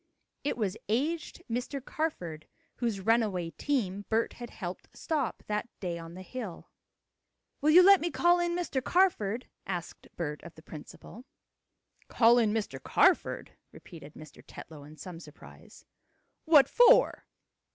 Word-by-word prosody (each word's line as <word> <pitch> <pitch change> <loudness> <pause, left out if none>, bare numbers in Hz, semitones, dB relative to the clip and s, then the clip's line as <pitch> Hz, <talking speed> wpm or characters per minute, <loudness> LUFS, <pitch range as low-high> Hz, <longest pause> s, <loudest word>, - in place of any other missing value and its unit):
It 285 - -2
was 210 -3 -2
aged 310 +9 -2
Mr. 245 +4 -3
Carford, 175 - -4 0.3
whose 230 -5 -2
runaway 195 -5 +1
team 205 - -2
Bert 225 +1 0
had 240 -1 -9
helped 180 -2 -8
stop 300 -7 -2
that 210 +2 -3
day 175 -3 -4
on 165 +1 -10
the 185 - -9
hill. 215 -5 -8 0.9
"Will 300 - +3
you 350 +4 +8
let 395 0 +7
me 345 - -1
call 345 +1 +3
in 345 0 0
Mr. 295 -7 -2
Carford?" 255 - +1 0.2
asked 175 -3 -6
Bert 150 -3 -4
of 170 - -12
the 160 - -15
principal. 175 - -11 0.8
"Call 235 +1 +5
in 220 -3 +2
Mr. 205 -12 -3
Carford?" - - +2 0.2
repeated 155 -3 -13
Mr. 155 0 -13
Tetlow 150 -3 -11
in 155 +1 -14
some 170 +2 -9
surprise. 155 -3 -15 0.6
"What 305 -4 +6
for?" 485 - +5
220 Hz, 140 wpm, -29 LUFS, 175-290 Hz, 0.9 s, you